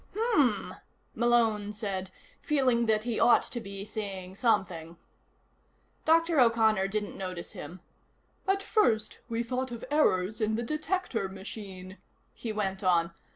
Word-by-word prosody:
"Hmm," 295 Hz, -, +2 dB, 0.4 s
Malone 225 Hz, -4 st, +2 dB
said, 195 Hz, -3 st, -4 dB, 0.3 s
feeling 255 Hz, -5 st, +2 dB
that 215 Hz, -1 st, +2 dB
he 235 Hz, -1 st, -2 dB
ought 235 Hz, +1 st, +6 dB
to 240 Hz, -, -5 dB
be 200 Hz, -2 st, -7 dB
saying 195 Hz, -4 st, -5 dB
something. 180 Hz, -7 st, 0 dB, 1.1 s
Dr. 330 Hz, -1 st, +4 dB
O'Connor 220 Hz, -5 st, +4 dB
didn't 210 Hz, +1 st, -3 dB
notice 185 Hz, -3 st, -5 dB
him. 180 Hz, +1 st, -9 dB, 0.7 s
"At 390 Hz, +1 st, +2 dB
first 220 Hz, -, +1 dB
we 230 Hz, 0 st, -1 dB
thought 255 Hz, +2 st, -2 dB
of 235 Hz, -2 st, -6 dB
errors 215 Hz, -8 st, +2 dB
in 215 Hz, 0 st, +1 dB
the 235 Hz, -, -1 dB
detector 305 Hz, -, -2 dB
machine," 190 Hz, -1 st, -8 dB, 0.3 s
he 230 Hz, -, -5 dB
went 195 Hz, -2 st, -2 dB
on. 170 Hz, -2 st, +3 dB
215 Hz, 130 wpm, -29 LUFS, 190-240 Hz, 1.1 s, ought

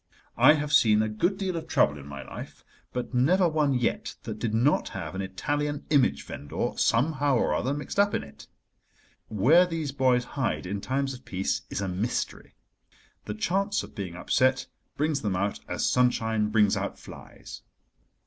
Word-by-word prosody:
I -, -, +8 dB
have 150 Hz, -1 st, -2 dB
seen 110 Hz, -1 st, +5 dB
a -, -, 0 dB
good 170 Hz, -, 0 dB
deal 190 Hz, -3 st, -2 dB
of 165 Hz, -1 st, -5 dB
trouble 75 Hz, -, +2 dB
in 70 Hz, -, -11 dB
my 70 Hz, -1 st, -7 dB
life, -, -, -10 dB, 0.3 s
but 125 Hz, +1 st, -4 dB
never 175 Hz, +9 st, +3 dB
one 150 Hz, -4 st, +1 dB
yet 125 Hz, -1 st, -1 dB
that -, -, -6 dB
did 115 Hz, -, -1 dB
not 120 Hz, +7 st, +2 dB
have 85 Hz, -4 st, -5 dB
an 95 Hz, -, -3 dB
Italian 145 Hz, +10 st, -3 dB
image 140 Hz, -4 st, +3 dB
vendor 70 Hz, -, -4 dB
somehow 140 Hz, +3 st, +2 dB
or -, -, +1 dB
other 130 Hz, -, 0 dB
mixed 150 Hz, +7 st, -4 dB
up 205 Hz, 0 st, +3 dB
in -, -, -2 dB
it. 70 Hz, -, -14 dB, 0.8 s
Where 140 Hz, -, +4 dB
these 160 Hz, -4 st, -3 dB
boys 130 Hz, -2 st, +2 dB
hide 130 Hz, -6 st, -2 dB
in 100 Hz, +2 st, -4 dB
times 135 Hz, +3 st, -1 dB
of 130 Hz, -, -11 dB
peace 90 Hz, -7 st, -2 dB
is -, -, -3 dB
a 100 Hz, -, -2 dB
mystery. 95 Hz, +7 st, -3 dB, 0.7 s
The 105 Hz, -, -5 dB
chance 195 Hz, -, 0 dB
of -, -, -11 dB
being 90 Hz, -4 st, -6 dB
upset 130 Hz, +8 st, +1 dB, 0.3 s
brings 150 Hz, -1 st, 0 dB
them 100 Hz, -4 st, -1 dB
out 100 Hz, +2 st, -1 dB
as -, -, -1 dB
sunshine 110 Hz, -4 st, +2 dB
brings 105 Hz, -2 st, +3 dB
out -, -, -3 dB
flies. -, -, -11 dB
125 Hz, 175 wpm, -27 LUFS, 105-150 Hz, 0.8 s, I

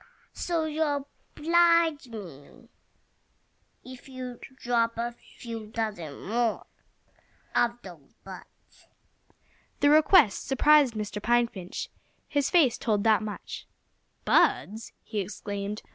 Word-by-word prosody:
So 335 Hz, -2 st, -1 dB
you'll 295 Hz, -2 st, -1 dB, 0.3 s
oblige 335 Hz, -2 st, +3 dB
me 180 Hz, -, -11 dB, 1.2 s
if 255 Hz, +1 st, -12 dB
you'll 255 Hz, -2 st, -7 dB, 0.2 s
drop 230 Hz, -2 st, 0 dB
a 235 Hz, +1 st, -2 dB
few 230 Hz, -2 st, -10 dB
dozen 210 Hz, -9 st, -5 dB
more 230 Hz, +1 st, 0 dB, 0.9 s
of 240 Hz, 0 st, +2 dB
those 170 Hz, -7 st, -13 dB
buds." -, -, -14 dB, 0.9 s
The 290 Hz, -, +4 dB
request 310 Hz, -, +5 dB
surprised 280 Hz, -2 st, +4 dB
Mr. 210 Hz, -1 st, -4 dB
Pine 240 Hz, +2 st, +3 dB
Finch. 185 Hz, -6 st, -7 dB, 0.4 s
His 285 Hz, -2 st, 0 dB
face 310 Hz, -10 st, +3 dB
told 210 Hz, -3 st, 0 dB
that 220 Hz, -1 st, +4 dB
much. 215 Hz, -1 st, -7 dB, 0.6 s
"Buds!" 220 Hz, +3 st, +2 dB
he 215 Hz, -, -4 dB
exclaimed. 200 Hz, +1 st, -5 dB
235 Hz, 105 wpm, -27 LUFS, 210-285 Hz, 1.2 s, request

